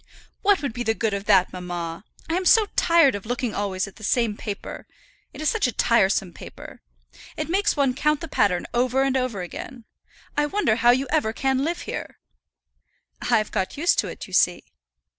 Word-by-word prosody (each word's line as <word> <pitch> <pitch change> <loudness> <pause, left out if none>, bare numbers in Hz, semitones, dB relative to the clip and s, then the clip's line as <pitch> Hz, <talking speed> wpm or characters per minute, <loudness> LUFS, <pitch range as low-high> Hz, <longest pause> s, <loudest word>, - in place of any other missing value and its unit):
"What 400 -5 +3
would 275 - -2
be 240 - -5
the 225 -2 0
good 220 -2 -1
of 200 0 -3
that, 185 -2 +4
mamma? 175 -1 -5 0.2
I 325 - -2
am 370 +2 0
so 440 +3 +6
tired 335 -6 +4
of 205 +1 -6
looking 245 -1 -2
always 195 -1 -2
at 195 - -14
the 215 - -13
same 225 0 +1
paper. 205 -1 -7 0.4
It - - -10
is 310 - +3
such 445 - +1
a - - -2
tiresome 195 -6 +2
paper. - - -11 0.6
It 310 +1 -3
makes 405 -1 +1
one 275 -3 +2
count 300 +2 +1
the 330 - -6
pattern 190 - +1
over 255 +2 +2
and 270 -1 0
over 250 -8 -1
again. 235 +6 -8 0.5
I 295 0 +2
wonder 295 - +1
how 240 - +4
you 260 +3 +4
ever 295 -9 +1
can 265 +2 0
live 335 +3 -2
here." - - -6 1.0
"I've 220 -3 +1
got 190 +3 -2
used 340 +4 +2
to - - 0
it, - - -7
you 190 - -14
see." 180 -1 +3
240 Hz, 200 wpm, -24 LUFS, 200-295 Hz, 1.0 s, so